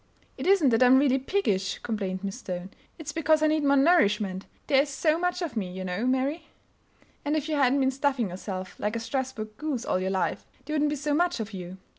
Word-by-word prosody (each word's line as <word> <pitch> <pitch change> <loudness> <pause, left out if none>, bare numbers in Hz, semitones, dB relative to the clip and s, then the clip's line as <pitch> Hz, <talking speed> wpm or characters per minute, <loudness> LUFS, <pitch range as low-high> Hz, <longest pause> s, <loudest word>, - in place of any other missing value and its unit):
"It - - -5
isn't 375 -8 +5
that 225 0 +2
I'm 255 +1 +7
really 270 -1 +3
piggish," 255 - 0
complained 195 -4 -3
Miss 195 -1 -4
Stone. 180 +1 -6 0.3
"It's 305 -3 -6
because 315 0 +2
I - - +5
need 310 0 +2
more 280 0 +4
nourishment; 210 - +3 0.2
there 270 -1 +4
is 285 - -3
so 310 +3 +1
much 360 +1 -1
of 315 -8 -4
me, 190 -5 -2
you 185 +1 -6
know, 185 +6 -2
Mary." 275 +5 0 0.8
"And 290 +1 0
if 305 -1 -1
you 310 - -1
hadn't 275 -1 +3
been 265 0 +2
stuffing 270 -5 0
yourself 185 0 -6
like 210 +2 -1
a - - -1
Strasburg 230 -3 -4
goose 290 -6 -3
all - - 0
your 190 +1 -1
life, 190 -1 -1 0.2
there 305 - -5
wouldn't 300 -1 +2
be 295 - -1
so 295 +1 -2
much 350 -1 +1
of 220 -1 -5
you. 180 0 -7
265 Hz, 225 wpm, -27 LUFS, 200-300 Hz, 0.8 s, I'm